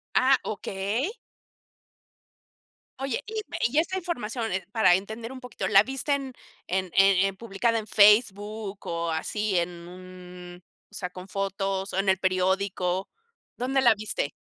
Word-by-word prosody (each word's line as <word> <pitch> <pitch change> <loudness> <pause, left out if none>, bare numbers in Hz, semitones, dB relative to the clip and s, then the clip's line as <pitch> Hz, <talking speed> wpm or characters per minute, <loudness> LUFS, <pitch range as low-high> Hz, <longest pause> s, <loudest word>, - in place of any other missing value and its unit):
Ah, 260 +1 +5
okey. 210 - -2 1.9
Oye, 270 0 -2
y 440 0 -3
ve - - -6
y 280 +5 -3
esta 375 +3 -1
información, 240 - -3
eh, 190 - -2
para 215 -6 +5
entender 220 +5 -5
un 260 - -9
poquito, 250 -3 -4
¿la 200 -1 +6
viste 270 +3 -1
en 270 -2 -3 0.3
en 185 -1 -1
en 195 -1 +5
en 195 -1 -2
publicada 230 +2 -1
en 215 -1 -4
Facebook, 210 -1 +3
o, 170 0 -2
así 200 +4 0
en 170 +1 +1 0.2
un 180 -1 -11 0.3
sea, 185 -3 -5
con 180 +1 -10
fotos, 195 0 -2
o, - - -2
en 195 - -1
el 190 0 +4
periódico? 185 0 0 0.5
¿Dónde 265 +2 +1
la 235 -3 +6
viste? 205 -8 -2
200 Hz, 150 wpm, -26 LUFS, 185-235 Hz, 1.9 s, la